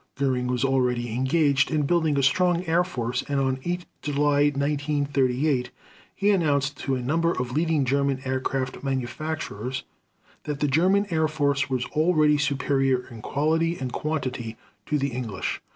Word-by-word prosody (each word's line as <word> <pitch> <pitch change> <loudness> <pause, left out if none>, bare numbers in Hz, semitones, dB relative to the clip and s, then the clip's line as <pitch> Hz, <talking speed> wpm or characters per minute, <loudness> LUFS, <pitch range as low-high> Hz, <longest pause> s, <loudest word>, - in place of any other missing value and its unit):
Göring 130 -3 0
was 125 +1 0
already 125 -3 0
engaged 140 +2 +2
in 155 -2 +1
building 160 -2 +2
a 140 - +2
strong 175 +5 +2
air 170 +2 +3
force 125 -8 -2
and 140 -1 +1
on 130 -1 0
8 175 0 -2 0.2
July 145 0 +2
1938 140 -2 0 0.5
he 205 +1 +2
announced 145 -6 +1
to 135 - -1
a 125 - -3
number 165 +6 +1
of 125 0 -3
leading 155 0 +1
German 140 0 +1
aircraft 130 0 -2
manufacturers 130 -2 -3 0.6
that 145 -2 -3
the 150 - +1
German 185 +8 +3
Air 160 -1 +2
Force 140 -2 0
was 130 -2 -1
already 155 -2 +3
superior 135 -3 +1
in 115 -2 -9
quality 160 +6 0
and 130 -2 -5
quantity 130 -7 -3 0.3
to 150 - +1
the 140 0 0
English. 115 -6 -4
140 Hz, 150 wpm, -25 LUFS, 130-155 Hz, 0.6 s, air